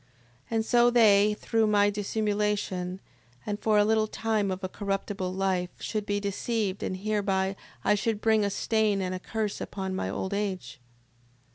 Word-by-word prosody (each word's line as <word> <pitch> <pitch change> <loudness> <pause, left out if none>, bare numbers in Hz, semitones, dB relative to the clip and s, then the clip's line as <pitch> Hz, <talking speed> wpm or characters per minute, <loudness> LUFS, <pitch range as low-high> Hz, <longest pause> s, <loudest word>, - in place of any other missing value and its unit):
And 225 -1 0
so 240 +1 +5
they, 210 -3 +5
through 225 -1 +1
my 205 -1 +4
dissimulation, 205 -3 -1 0.5
and 205 -1 -3
for 215 -1 +2
a 205 - +5
little 220 0 +2
time 215 -2 -1
of 190 +1 -4
a - - 0
corruptible 195 -1 -3
life, 185 -1 0
should 215 -2 -3
be 205 0 0
deceived, 200 0 -2
and 185 - -2
hereby 195 -1 0 0.3
I - - +4
should 215 +1 0
bring 220 -1 +3
a 200 - +1
stain 215 0 +1
and 185 -1 -2
a 185 - -3
curse 215 +1 -3
upon 190 -1 -4
my 190 - -2
old 190 - -3
age. 195 -8 -3
205 Hz, 165 wpm, -28 LUFS, 195-215 Hz, 0.5 s, so